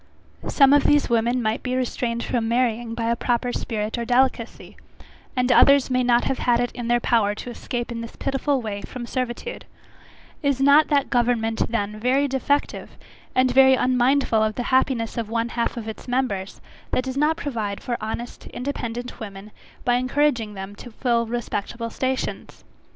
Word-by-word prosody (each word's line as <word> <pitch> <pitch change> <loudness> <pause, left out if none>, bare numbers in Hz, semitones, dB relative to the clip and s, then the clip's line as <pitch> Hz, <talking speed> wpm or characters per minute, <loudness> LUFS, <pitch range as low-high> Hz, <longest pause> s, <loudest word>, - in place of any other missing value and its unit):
Some 275 -1 +5
of 290 -1 +4
these 295 -3 +3
women 235 +2 +2
might 220 +1 -1
be 255 0 -2
restrained 240 -2 -2
from 235 -2 -1
marrying 235 -1 0
by 230 0 -1
a - - +2
proper 245 +1 -1
spirit 215 +1 -3
or - - -1
delicacy, 245 -1 0 0.6
and 250 0 +2
others 280 0 +5
may 255 0 +2
not 245 -1 +3
have 270 - -1
had 240 -1 +2
it 245 0 0
in 240 -1 -6
their 240 0 +3
power 215 -4 +2
to 245 - -7
escape 240 0 -4
in 230 -1 -4
this 230 - -8
pitiful 275 -1 -1
way 205 -2 -4
from 250 -1 -7
servitude; 255 - -4 0.8
is 280 -3 +1
not 285 +3 +6
that 285 -2 +1
government 235 -2 +1
then 210 -2 -2
very 260 +5 +2
defective, 275 +2 -1 0.4
and 255 0 +3
very 265 0 +7
unmindful 255 -2 +2
of 215 -1 0
the 245 - -2
happiness 245 -3 +1
of 225 -2 -4
one 230 +1 -1
half 235 0 -2
of 225 -2 -5
its 220 - -8
members, 245 -7 -2 0.3
that 255 - 0
does 260 0 -4
not 300 +3 +2
provide 225 -10 -3
for 240 - -2
honest, 230 +3 -6
independent 245 -2 -5
women, 205 -1 -9 0.3
by 245 0 +3
encouraging 250 -4 0
them 195 +1 -7
to 245 - -10
fill 235 0 0
respectable 230 0 -4
stations? 260 +2 -3
245 Hz, 175 wpm, -23 LUFS, 230-260 Hz, 0.8 s, very